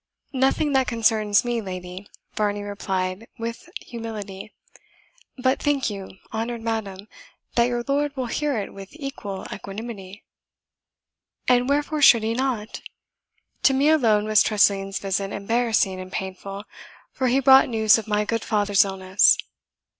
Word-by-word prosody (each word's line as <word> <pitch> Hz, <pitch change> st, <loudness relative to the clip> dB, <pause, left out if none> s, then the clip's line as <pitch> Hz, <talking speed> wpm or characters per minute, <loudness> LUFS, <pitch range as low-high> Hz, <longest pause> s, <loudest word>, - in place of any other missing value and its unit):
"Nothing 270 Hz, +3 st, +1 dB
that 265 Hz, -1 st, +2 dB
concerns 220 Hz, -3 st, +2 dB
me, 240 Hz, -1 st, -1 dB
lady," 185 Hz, 0 st, -7 dB, 0.3 s
Varney 205 Hz, -1 st, -1 dB
replied 195 Hz, 0 st, -3 dB
with 230 Hz, +7 st, -6 dB
humility. 215 Hz, -4 st, -7 dB, 0.9 s
"But, 260 Hz, +1 st, +1 dB
think 280 Hz, -6 st, +1 dB
you, 195 Hz, -1 st, -8 dB, 0.2 s
honoured 230 Hz, +1 st, -3 dB
madam, 210 Hz, -3 st, -4 dB, 0.5 s
that 235 Hz, -, +3 dB
your 240 Hz, -1 st, -2 dB
lord 285 Hz, 0 st, 0 dB
will 260 Hz, -, -1 dB
hear 285 Hz, +2 st, -1 dB
it 200 Hz, -, -4 dB
with 195 Hz, -1 st, -10 dB
equal 275 Hz, -10 st, -6 dB
equanimity?" 200 Hz, -1 st, -8 dB, 1.2 s
"And 250 Hz, +1 st, +3 dB
wherefore 295 Hz, +1 st, 0 dB
should 240 Hz, -5 st, +7 dB
he 225 Hz, +1 st, 0 dB
not? 240 Hz, -4 st, -2 dB, 0.8 s
To 270 Hz, -, +4 dB
me 280 Hz, +3 st, +3 dB
alone 225 Hz, -9 st, +3 dB
was 215 Hz, -1 st, +4 dB
Tressilian's 195 Hz, -2 st, +2 dB
visit 195 Hz, 0 st, -2 dB
embarrassing 220 Hz, -2 st, 0 dB
and 185 Hz, 0 st, -8 dB
painful, 195 Hz, +1 st, -6 dB, 0.5 s
for 260 Hz, -, -1 dB
he 255 Hz, +2 st, +3 dB
brought 265 Hz, 0 st, +6 dB
news 220 Hz, -1 st, +4 dB
of 225 Hz, -, -9 dB
my 210 Hz, 0 st, +1 dB
good 230 Hz, +1 st, -2 dB
father's 205 Hz, -1 st, +3 dB
illness." 190 Hz, 0 st, +3 dB
220 Hz, 140 wpm, -23 LUFS, 200-250 Hz, 1.2 s, should